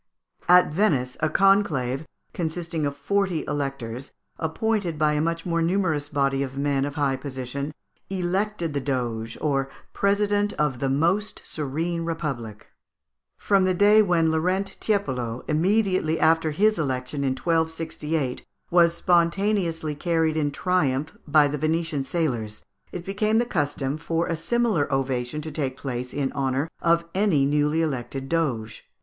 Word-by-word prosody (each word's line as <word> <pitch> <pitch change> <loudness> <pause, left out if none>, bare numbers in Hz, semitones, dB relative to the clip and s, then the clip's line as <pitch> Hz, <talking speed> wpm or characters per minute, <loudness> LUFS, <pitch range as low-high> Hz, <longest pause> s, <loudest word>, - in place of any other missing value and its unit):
At 180 -3 +6
Venice, 140 -10 +1
a 155 - +1
conclave, 160 -9 +2 0.3
consisting 165 -2 -2
of 140 - -4
forty 185 +3 0
electors, 135 -3 -4 0.3
appointed 180 +1 -1
by 150 0 +2
a 150 - +1
much 165 +1 -1
more 170 -1 0
numerous 165 -4 0
body 140 -2 +1
of 135 -1 -4
men 140 -1 +1
of 145 0 -5
high 140 -3 +1
position, 135 +1 -5 0.4
elected 190 -2 -1
the 140 - -1
Doge, 120 -4 -2
or 135 -3 0 0.2
president 205 +1 +1
of 145 -5 -1
the 135 - 0
most 170 +10 0
serene 165 +4 -2
Republic. 140 -10 -4 0.7
From 195 -2 +2
the 185 -1 +2
day 205 +3 +6
when 170 -5 +2
Laurent 185 +5 0
Tiepolo, 130 - -1
immediately 185 0 +1
after 160 0 +3
his 210 +7 +2
election 135 -1 -2
in 135 -1 +1
1268, 160 -2 -1 0.3
was 170 -1 +5
spontaneously 170 -2 +1
carried 160 0 0
in 150 -2 +1
triumph 150 -3 0
by 145 0 +5
the 145 +1 -3
Venetian 155 -1 0
sailors, 120 -9 -2 0.3
it 175 -1 -6
became 215 +3 +1
the 240 - +3
custom 145 - -1
for 165 +1 -1
a 165 - -1
similar 205 -1 0
ovation 135 +1 -1
to 155 +1 -6
take 135 -3 -2
place 125 -2 -4
in 140 -2 -1
honour 135 +2 -1
of 170 0 +3
any 185 -8 +3
newly 150 +3 +2
elected 135 -2 -3
doge. 120 -10 -2
155 Hz, 145 wpm, -25 LUFS, 135-175 Hz, 0.7 s, At